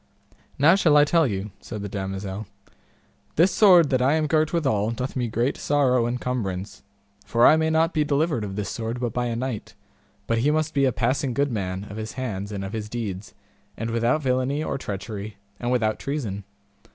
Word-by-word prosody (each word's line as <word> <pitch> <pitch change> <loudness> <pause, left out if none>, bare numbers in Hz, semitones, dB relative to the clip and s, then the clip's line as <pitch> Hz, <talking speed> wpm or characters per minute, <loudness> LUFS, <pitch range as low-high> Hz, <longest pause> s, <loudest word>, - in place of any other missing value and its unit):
Now 150 +5 +6
shall 165 -6 +4
I 145 - +7
tell 165 0 +3
you, 100 -1 -4
said 105 -3 -7
the - - -3
damosel; 95 +1 -5 0.9
this 175 +5 +4
sword 180 -8 +6
that 130 -1 +2
I 135 +3 +3
am 155 -1 +1
girt 155 0 +2
withal 130 -11 +1
doth 125 +3 -4
me 125 -2 0
great 120 +5 -1
sorrow 130 -5 +2
and 125 +1 -2
cumbrance, 100 -6 -4 0.4
for 115 0 +3
I - - +8
may 160 0 +1
not 160 +2 +2
be 155 - +2
delivered 150 -3 0
of 100 -2 -5
this 105 -1 -3
sword 115 +1 -4
but 120 -2 -2
by 125 0 -1
a 115 - -2
knight, 125 -2 -4 0.5
but 115 0 0
he 135 +6 +2
must 155 +1 0
be 140 -1 +3
a 130 - +3
passing 125 +2 0
good 140 -1 +1
man 95 -3 -3
of 105 0 -9
his 110 0 -5
hands 105 -6 -4
and 100 -1 -4
of 95 - -7
his 105 -1 -4
deeds, 105 -4 -5 0.4
and 115 +1 -3
without 120 +7 +1
villainy 130 +3 0
or 140 - -3
treachery, 100 0 -6 0.2
and 120 0 -2
without 110 -4 +1
treason. 110 -9 -4
120 Hz, 200 wpm, -24 LUFS, 105-145 Hz, 0.9 s, I